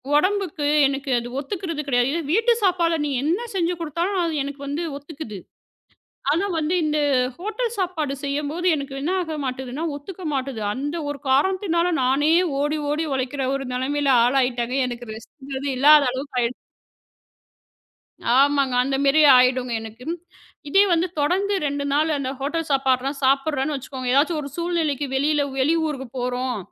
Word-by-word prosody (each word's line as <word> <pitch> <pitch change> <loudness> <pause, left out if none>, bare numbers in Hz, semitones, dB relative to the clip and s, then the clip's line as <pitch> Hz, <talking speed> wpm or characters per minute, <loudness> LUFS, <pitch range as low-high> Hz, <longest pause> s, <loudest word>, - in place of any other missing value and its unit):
உடம்புக்கு 370 -2 +1 0.2
எனக்கு 275 +1 -2
அது 235 - -7
ஒத்துக்கறது 330 0 -4
கிடையாது. 245 -2 +2
இதே 335 - -1
வீட்டு 455 +4 +4
சாப்பாட 345 -3 +2
நீங்க 285 -3 -1
என்ன 345 +8 +1
செஞ்சு 350 -1 +1
கொடுத்தாலும் 340 +5 -1
அது 335 -1 -1
எனக்கு 280 0 -7
வந்து 285 +4 -2 0.2
ஒத்துக்குது. 285 -7 -8 0.9
ஆனா 340 +7 +1
வந்து 315 +2 0
இந்த 305 0 0 0.4
ஹோட்டல் 440 +5 -3
சாப்பாடு 340 -7 -1
செய்யும்போது 295 +5 -2
எனக்கு 280 -2 -5
என்ன 310 +6 -1
ஆகமாட்டேதுன்னா. 275 -3 -4
ஒத்துக்க 370 +6 -10
மாட்டேகுது. 265 -4 -3
அந்த 285 +6 -3
ஒரு 290 -1 -5
காரணத்தினால 345 +4 +2
நானே 280 +5 +3 0.3
ஓடி, 295 +2 0
ஓடி 305 +2 0
உழைக்கிற 265 +1 -2
ஒரு 275 0 -4
நிலைமையில 280 +3 0 0.2
ஆளாயிட்டமே. 250 -1 +1
எனக்கு 240 -1 -7
ரெஸ்ட் 265 +4 -8
இல்லாத 295 +2 +7
அளவுக்கு 260 +1 -5
ஆயிடுச்சு. 235 +1 -1 1.8
ஆமாங்க. 275 -2 +3
அந்த 270 +1 0
மாரி 280 +3 +4 0.2
ஆயிடும். 250 0 +3
எனக்கு 225 +2 -10 0.6
இதே 390 +7 +5
வந்து 340 +1 +2
தொடர்ந்து 380 +7 +1
2 285 0 -2
நாள் 305 +3 +2
அந்த 265 -2 -3
ஹோட்டல் 315 +4 -2
சாப்பாட்லாம் 270 +1 +1
சாப்பிடுறேன்னு 275 +2 +1
வச்சுக்கோங்க. 260 -1 -6
எதாச்சு 305 +4 +3
ஒரு 280 - -6
சூழ்நிலைக்கு 330 -5 -1
வெளியில 290 +2 +2
வெளி 280 +5 +3
ஊருக்குப் 265 -5 -5
போறோம். 250 -1 -2
285 Hz, 145 wpm, -23 LUFS, 265-330 Hz, 1.8 s, இல்லாத